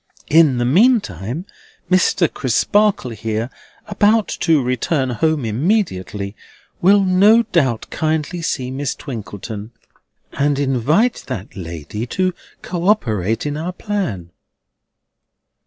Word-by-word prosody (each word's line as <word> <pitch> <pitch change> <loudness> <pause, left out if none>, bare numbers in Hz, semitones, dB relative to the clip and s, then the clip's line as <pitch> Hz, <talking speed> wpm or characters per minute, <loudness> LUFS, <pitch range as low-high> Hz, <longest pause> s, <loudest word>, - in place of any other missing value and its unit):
In 155 -5 +5
the 120 - 0
meantime, 155 - +2 0.5
Mr. 185 -1 +3
Crisparkle 170 - +1
here, 110 +2 -3 0.3
about 210 +1 +2
to 165 -3 +3
return 130 +2 0
home 150 +2 0
immediately, 105 - -1 0.5
will 200 +3 +5
no 200 +5 +5
doubt 135 - 0
kindly 160 +2 -1
see 130 -6 -2
Miss 135 0 -3
Twinkleton, 110 -4 -7 0.6
and 140 0 +1
invite 145 - +1
that 110 -9 -6
lady 85 - -6
to 185 +6 0 0.3
co 175 0 -3
operate 110 - +1
in 145 0 -2
our 165 +4 -4
plan." 175 - -3
145 Hz, 105 wpm, -19 LUFS, 115-185 Hz, 0.6 s, In